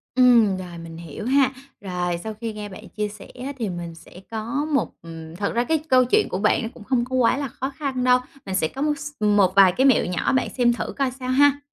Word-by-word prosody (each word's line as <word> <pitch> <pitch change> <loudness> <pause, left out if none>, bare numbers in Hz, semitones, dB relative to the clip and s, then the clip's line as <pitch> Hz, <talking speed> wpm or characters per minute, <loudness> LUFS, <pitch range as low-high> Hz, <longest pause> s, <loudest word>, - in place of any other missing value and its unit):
Ừm, 235 -6 +5
rồi, 180 -2 -8
mình 165 0 -9
hiểu 170 +5 -8
ha. 265 0 +4 0.3
Rồi. 180 -3 -2
sau 220 - -4
khi 230 -1 -3
nghe 210 -1 -6
bạn 190 - -11
chia 210 0 -3
sẻ 210 0 -11 0.2
á 280 - -3
thì 225 -4 -2
mình 175 -2 -6
sẽ 165 +2 -14
có 230 +6 -2
một - - +2
ừm, 165 0 -9
thật 200 +1 -2
ra 240 - +2
cái 320 +5 +1
câu 255 -1 +5
chuyện 245 - +2
của 185 - -3
bạn 210 +3 +2
nó 225 - -3
cũng 240 - -12
hông 250 -2 +2
có 260 +1 -3
quá 250 0 +3
là 280 -2 -3
khó 265 +4 -4
khăn 265 -4 -2
đâu, 250 0 +5 0.3
mình 190 - -4
sẽ 160 -4 +1
có 270 - -6
một 295 -1 +1
s 290 +1 -6
một 205 -3 +3
vài 195 -2 +7
cái 255 +8 +1
mẹo 270 -4 +5
nhỏ 180 -1 -1
bạn 260 - +1
xem 240 -1 +4
thử 240 - -4
coi 270 -2 0
sao 255 0 -7
ha. 285 +2 +4
225 Hz, 260 wpm, -23 LUFS, 185-260 Hz, 0.3 s, vài